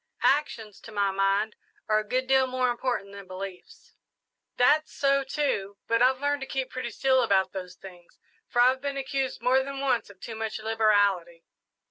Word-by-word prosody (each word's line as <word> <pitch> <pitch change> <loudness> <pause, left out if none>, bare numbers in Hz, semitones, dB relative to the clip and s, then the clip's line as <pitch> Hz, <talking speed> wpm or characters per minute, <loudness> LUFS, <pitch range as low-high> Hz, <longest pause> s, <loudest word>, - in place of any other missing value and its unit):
Actions, 235 -7 0
to 225 - -12
my 200 -2 +1
mind, 195 +2 +1 0.3
are 215 0 +3
a - - -3
good 255 +5 -1
deal 265 0 +3
more 255 -1 0
important 240 -5 -3
than 200 -1 -10
beliefs." 185 0 -9 0.6
"That's 300 +5 +3
so, 275 0 +2
too, 265 -8 -2
but 230 0 +1
I've 255 +1 +4
learned 285 0 0
to 270 - -5
keep 265 -1 -3
pretty 255 -2 -4
still 260 +3 +2
about 190 -5 +2
those 180 -1 -7
things, 180 -3 -14 0.3
for 240 - +3
I've 260 +1 +3
been 280 0 -3
accused 270 -1 -3
more 260 +1 +4
than 275 0 -5
once 260 -6 0
of 200 -2 -16
too 230 - -7
much 220 0 -4
liberality." 205 -6 +1
230 Hz, 180 wpm, -27 LUFS, 200-265 Hz, 0.6 s, I've